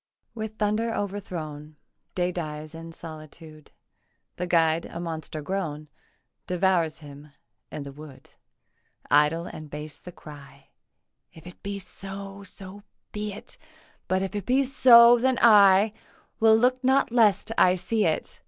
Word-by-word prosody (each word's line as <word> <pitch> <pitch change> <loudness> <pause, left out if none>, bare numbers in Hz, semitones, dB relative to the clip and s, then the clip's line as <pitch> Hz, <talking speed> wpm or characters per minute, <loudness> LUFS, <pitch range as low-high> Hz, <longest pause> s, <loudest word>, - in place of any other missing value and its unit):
With 220 -1 -6
thunder 215 +2 0
overthrown 160 -7 -6 0.4
Day 180 0 0
dies 155 -3 -6
in 165 0 -9
solitude; 155 -1 -12 0.7
The 180 - -3
guide, 165 -1 +2
a 170 - -8
monster 160 -2 -6
grown, 155 -4 -4 0.6
Devours 180 -3 0
him 145 +1 -13 0.4
in 145 - -6
the 140 - -9
wood. 145 -1 -14 0.8
Idle 150 +3 +3
and 155 -3 -9
base 150 +1 -8
the 180 - -11
cry 140 -4 -14 0.6
'If 160 - -16
it 180 - -13
be 200 0 -5
so, 195 +1 -8
so 195 +1 -10 0.3
be 210 0 -4
it; 210 - -12 0.5
But 185 0 0
if 195 - -4
it 205 -3 -5
be 260 +2 +3
so, 240 -3 +7
then 260 +1 +1
I 205 -2 +6 0.5
Will 220 0 +6
look 255 +3 +1
not 265 -1 +2
lest 225 -3 +2
I 180 0 +4
see 210 +4 -1
it. 160 - -3
180 Hz, 140 wpm, -25 LUFS, 155-210 Hz, 0.8 s, so